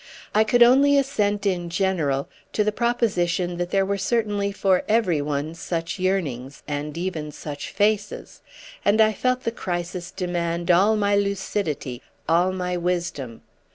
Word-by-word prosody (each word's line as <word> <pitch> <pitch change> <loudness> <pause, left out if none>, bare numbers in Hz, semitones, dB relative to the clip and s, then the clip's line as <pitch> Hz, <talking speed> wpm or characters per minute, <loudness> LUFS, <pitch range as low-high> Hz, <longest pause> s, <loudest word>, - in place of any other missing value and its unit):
I 215 - +5
could 240 +2 +5
only 275 +4 +5
assent 210 -7 0
in 175 -3 0
general 165 -7 0 0.3
to 210 - +2
the 215 - +1
proposition 185 -7 0
that 175 0 -2
there 195 0 +2
were 200 0 -1
certainly 205 -1 0
for 195 -2 +2
every 210 -9 +2
one 145 +2 -2
such 165 +2 -4
yearnings, 145 -9 -2
and 150 +1 -4
even 165 -4 -3
such 145 0 -7
faces; 210 0 -1 0.4
and 205 +2 +3
I 220 0 +5
felt 255 +4 0
the 230 - -1
crisis 175 -3 -4
demand 175 -1 -1
all 195 +5 +5
my 205 -1 +2
lucidity, 195 -10 -2 0.3
all 175 +3 +3
my 180 -1 -2
wisdom. 170 -9 -3
185 Hz, 150 wpm, -24 LUFS, 170-205 Hz, 0.4 s, I